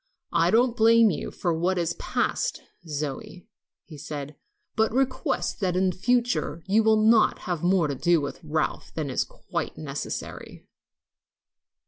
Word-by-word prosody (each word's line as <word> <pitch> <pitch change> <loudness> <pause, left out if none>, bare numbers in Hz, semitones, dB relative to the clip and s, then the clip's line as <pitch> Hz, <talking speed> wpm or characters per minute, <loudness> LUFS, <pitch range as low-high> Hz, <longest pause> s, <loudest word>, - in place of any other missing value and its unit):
"I - - +3
don't 240 +1 +3
blame 230 -1 +5
you 155 - -4
for 175 - -2
what 175 +3 0
is 170 -1 0
past, - - -2 0.2
Zoe," 150 +3 -5 0.4
he 155 -3 -12
said, 150 -1 -6 0.4
"but 220 -1 +2
request 260 +2 -1
that 185 -4 0
in 185 0 +2
future 220 -5 0
you 205 +3 +3
will 220 0 +4
not 220 0 +5
have 175 -4 -3
more 180 -2 +3
to 140 - -2
do 170 +5 +2
with 140 -1 -5
Ralph 155 0 -2
than 150 -4 -3
is - - +1
quite - - -5
necessary." - - -6
180 Hz, 145 wpm, -26 LUFS, 155-220 Hz, 0.4 s, blame